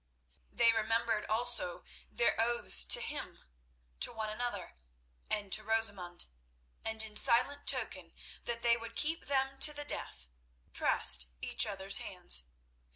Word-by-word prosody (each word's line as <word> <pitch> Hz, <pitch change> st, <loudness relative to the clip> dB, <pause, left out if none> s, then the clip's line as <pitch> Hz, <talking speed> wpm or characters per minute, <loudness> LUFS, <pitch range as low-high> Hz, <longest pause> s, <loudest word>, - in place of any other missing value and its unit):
They 235 Hz, -1 st, +2 dB
remembered 225 Hz, 0 st, -2 dB
also 220 Hz, -5 st, +2 dB, 0.3 s
their 235 Hz, -, 0 dB
oaths 230 Hz, -, +1 dB
to -, -, +9 dB
him, -, -, -7 dB, 0.6 s
to -, -, +2 dB
one 220 Hz, -2 st, -6 dB
another, 215 Hz, -5 st, -6 dB, 0.6 s
and 205 Hz, -2 st, -2 dB
to 215 Hz, -, +1 dB
Rosamund; 200 Hz, -5 st, -1 dB, 0.6 s
and 220 Hz, 0 st, -1 dB
in 215 Hz, -1 st, -10 dB
silent 255 Hz, +5 st, +2 dB
token -, -, -1 dB, 0.3 s
that 235 Hz, -1 st, -4 dB
they 235 Hz, -1 st, +2 dB
would 230 Hz, 0 st, -11 dB
keep 320 Hz, +2 st, -1 dB
them 270 Hz, -1 st, -2 dB
to 300 Hz, -, +7 dB
the 290 Hz, 0 st, -8 dB
death, 60 Hz, -, -8 dB, 0.5 s
pressed 60 Hz, 0 st, +2 dB
each -, -, +1 dB
other's 195 Hz, -1 st, -1 dB
hands. 65 Hz, -, 0 dB
225 Hz, 135 wpm, -31 LUFS, 200-240 Hz, 0.6 s, to